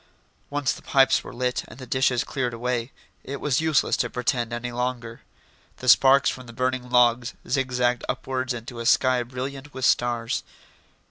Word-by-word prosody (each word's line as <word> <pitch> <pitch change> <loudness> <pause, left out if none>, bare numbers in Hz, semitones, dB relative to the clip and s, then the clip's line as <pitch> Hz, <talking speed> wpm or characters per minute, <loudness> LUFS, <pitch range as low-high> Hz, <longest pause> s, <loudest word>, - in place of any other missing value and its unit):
Once 145 -2 0
the - - -11
pipes 135 -1 +3
were - - -9
lit, 125 0 -2
and - - -13
the 130 - -9
dishes 130 -1 +1
cleared 125 -4 -3
away, 120 +1 -2 0.3
it 140 0 -6
was 145 -1 +1
useless 160 -3 +2
to - - -1
pretend 120 -1 -1
any 120 +1 -4
longer. 120 -1 -4 0.6
The 125 - -8
sparks 135 +2 +6
from 130 -1 -9
the 115 - -10
burning 130 +1 -2
logs 125 0 +3
zigzagged 125 -2 0
upwards 130 0 -2
into 120 0 -6
a 115 - -2
sky 130 0 +4
brilliant 135 +3 -6
with 130 -2 -1
stars. 120 -1 +1
125 Hz, 170 wpm, -24 LUFS, 120-130 Hz, 0.6 s, sparks